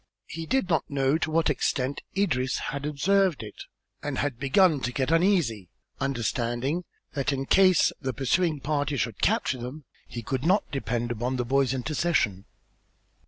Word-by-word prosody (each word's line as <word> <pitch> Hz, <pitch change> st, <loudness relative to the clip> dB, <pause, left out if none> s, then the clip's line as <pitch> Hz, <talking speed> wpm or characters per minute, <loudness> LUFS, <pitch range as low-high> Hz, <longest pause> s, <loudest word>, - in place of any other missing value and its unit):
He 165 Hz, 0 st, -7 dB
did 265 Hz, -6 st, +1 dB
not 165 Hz, -3 st, 0 dB
know 140 Hz, +2 st, +1 dB
to 160 Hz, -, -1 dB
what 160 Hz, -1 st, +2 dB
extent 135 Hz, -1 st, -1 dB, 0.2 s
Idris 130 Hz, -10 st, +1 dB, 0.2 s
had 140 Hz, +1 st, -3 dB
observed 180 Hz, -, +2 dB
it 105 Hz, -, -9 dB, 0.4 s
and 145 Hz, -2 st, -3 dB
had 140 Hz, -5 st, -2 dB
begun 150 Hz, +3 st, +4 dB
to 125 Hz, -, -2 dB
get 130 Hz, +3 st, -1 dB
uneasy, 165 Hz, -, +2 dB, 0.3 s
understanding 125 Hz, +5 st, -1 dB, 0.3 s
that, 140 Hz, 0 st, 0 dB
in 135 Hz, -1 st, -2 dB
case 185 Hz, +1 st, +5 dB
the 135 Hz, -2 st, -1 dB
pursuing 150 Hz, +5 st, 0 dB
party 145 Hz, -1 st, -1 dB
should 115 Hz, -5 st, -2 dB
capture 130 Hz, -, +1 dB
them, 130 Hz, +5 st, -7 dB, 0.2 s
he 120 Hz, -, -7 dB
could 130 Hz, +2 st, -2 dB
not 185 Hz, +6 st, +3 dB
depend 120 Hz, -3 st, -2 dB
upon 120 Hz, +3 st, -2 dB
the 125 Hz, -1 st, -1 dB
boy's 135 Hz, 0 st, +2 dB
intercession. 130 Hz, -, 0 dB
140 Hz, 160 wpm, -27 LUFS, 125-160 Hz, 0.4 s, case